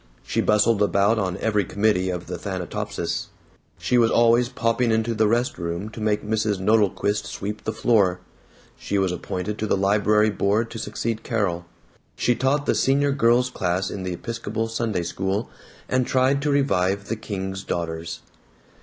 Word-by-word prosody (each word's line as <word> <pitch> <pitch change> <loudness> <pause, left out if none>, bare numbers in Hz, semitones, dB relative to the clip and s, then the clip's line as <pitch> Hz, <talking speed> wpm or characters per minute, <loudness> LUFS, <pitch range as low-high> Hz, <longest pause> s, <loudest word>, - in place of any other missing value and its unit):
She - - -1
bustled 105 0 +3
about 100 +2 +3
on 95 -2 -1
every 105 -2 +1
committee 100 0 +1
of 90 -1 -4
the - - -6
Thanatopsis; 95 -4 -3 0.5
she 125 - +1
was 115 -1 +4
always 120 +1 +4
popping 120 -2 +1
into 110 +1 +1
the 110 -1 +2
rest 120 +1 0
room 85 +4 -3
to 110 0 -9
make 105 -1 0
Mrs. 105 -1 0
Nodelquist 105 0 +1
sweep 100 +1 -5
the 110 - 0
floor; 100 -5 +2 0.6
she 100 - -3
was 95 -2 +1
appointed 90 +3 -4
to 110 - -1
the 100 - +2
library 105 +2 +3
board 105 +3 0
to 115 - -6
succeed 115 0 -3
Carol; 90 -7 -2 0.5
she 120 - +2
taught 135 +4 0
the - - +2
Senior 140 +1 +2
Girls' 125 -1 +3
Class 95 -2 -1
in 100 - -5
the 95 -1 -3
Episcopal 115 +2 -4
Sunday 115 -5 -2
School, 95 +5 -2 0.4
and 130 -1 +1
tried 130 +2 +2
to 150 - 0
revive 100 -9 +1
the 115 - -1
King's 95 -3 -5
Daughters. 80 -1 -4
105 Hz, 165 wpm, -23 LUFS, 95-115 Hz, 0.6 s, was